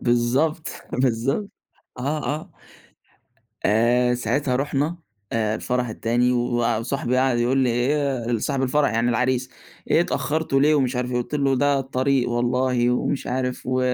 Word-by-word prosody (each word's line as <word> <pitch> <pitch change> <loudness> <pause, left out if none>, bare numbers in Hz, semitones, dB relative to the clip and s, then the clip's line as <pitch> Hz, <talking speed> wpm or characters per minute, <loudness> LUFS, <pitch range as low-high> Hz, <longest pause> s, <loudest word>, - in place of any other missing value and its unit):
بالضبط، 130 +7 +1 0.2
بالضبط. 130 - 0 0.5
آه، 145 +4 -2
آه. 165 +5 -8 1.2
آآ 120 +3 +3
ساعتها 125 +2 0
رُحنا 145 +4 -1 0.4
الفرح 115 +3 -1
التاني 120 +3 +1
و 120 -2 0
وصاحبي 125 +1 -1
قعد 130 -2 +2
يقول 125 +3 +2
لي: 130 -2 +3
"إيه"، 125 -2 0
صاحب 135 +3 -1
الفرح 140 -1 +2
يعني 115 +1 +1
العريس، 125 +2 0 0.4
"إيه - - +5
اتأخرتوا 155 -4 0
ليه" 150 +2 +4
ومش 130 -3 +1
عارف 125 0 -2
إيه، - - 0
قُلت 120 +5 -4
له: 135 -2 +2
"ده 145 +1 +2
الطريق 135 -1 0
والله"، 120 0 +1
ومش 125 +2 -1
عارف 125 0 -3
"و 130 0 0
125 Hz, 140 wpm, -23 LUFS, 120-140 Hz, 1.2 s, إيه